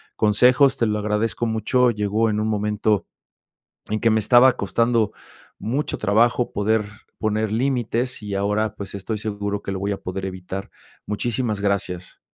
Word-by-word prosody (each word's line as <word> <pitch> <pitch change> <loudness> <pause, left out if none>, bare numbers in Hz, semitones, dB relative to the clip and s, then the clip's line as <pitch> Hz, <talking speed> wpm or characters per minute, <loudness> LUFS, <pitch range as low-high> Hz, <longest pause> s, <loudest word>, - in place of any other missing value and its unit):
consejos. 125 +6 +4
Te 115 - +2
lo 105 0 0
agradezco 105 +3 -1
mucho. 115 +3 +2
Llegó 105 +1 0
en 105 0 0
un 110 - 0
momento 105 -1 0 0.9
en 110 - 0
que 115 - +3
me 110 0 +3
estaba 125 +4 +6
costando 110 +3 +1 0.5
mucho 135 +7 -2
trabajo 115 +3 +2
poder 105 +1 +1 0.3
poner 110 -1 0
límites, 125 -1 -1
y 100 -1 -4
ahora 105 +2 0
pues, 100 -2 -8
estoy 105 +3 -4
seguro 105 -1 -3
que 100 - -4
lo 95 - -3
voy 100 +1 -1
a 100 - -4
poder 95 +1 -4
evitar. 95 +1 -6 0.4
Muchísimas 110 0 -1
gracias. 95 -3 -2
105 Hz, 155 wpm, -22 LUFS, 100-115 Hz, 0.9 s, estaba